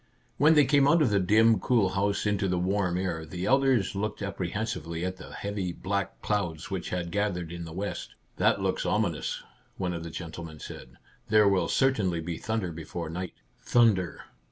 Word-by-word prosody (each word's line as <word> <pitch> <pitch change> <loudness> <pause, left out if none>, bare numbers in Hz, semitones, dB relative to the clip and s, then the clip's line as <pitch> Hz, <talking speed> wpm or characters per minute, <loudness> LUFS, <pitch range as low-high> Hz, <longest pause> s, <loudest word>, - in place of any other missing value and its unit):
When 155 +4 +6
they 150 -2 +6
came 140 0 +4
out 165 +1 +5
of 125 - +2
the 100 - +3
dim, 110 +3 +4
cool 110 -1 +2
house 100 +2 0
into 105 -1 +1
the 90 -1 0
warm 90 0 0
air, 90 -4 -2
the 90 +3 -5
elders 135 -5 +3
looked 105 +2 -3
appre 100 -3 -3
hensively 85 -6 -3
at 95 0 -3
the 95 - -11
heavy 100 -3 -3
black 100 +2 -3
clouds 85 -4 -2
which 95 -3 -3
had 85 -1 -3
gathered 90 -4 -1
in 85 0 -6
the 80 - -8
west. 100 +5 -5
" - - -39
That - - +3
looks - - 0
ominous," - - -1 0.3
one 90 -2 -1
of 85 -1 -5
the 85 - -6
gentle 85 0 -7
men 80 -2 -9
said. - - -10
" - - -33
There 105 -1 +6
will 95 -4 +3
certainly 105 -11 +2
be 80 0 -4
thunder 110 -5 -2
before 80 0 -6
night." 90 +1 -5 0.2
Thunder 110 -8 +2
95 Hz, 200 wpm, -28 LUFS, 85-105 Hz, 0.3 s, When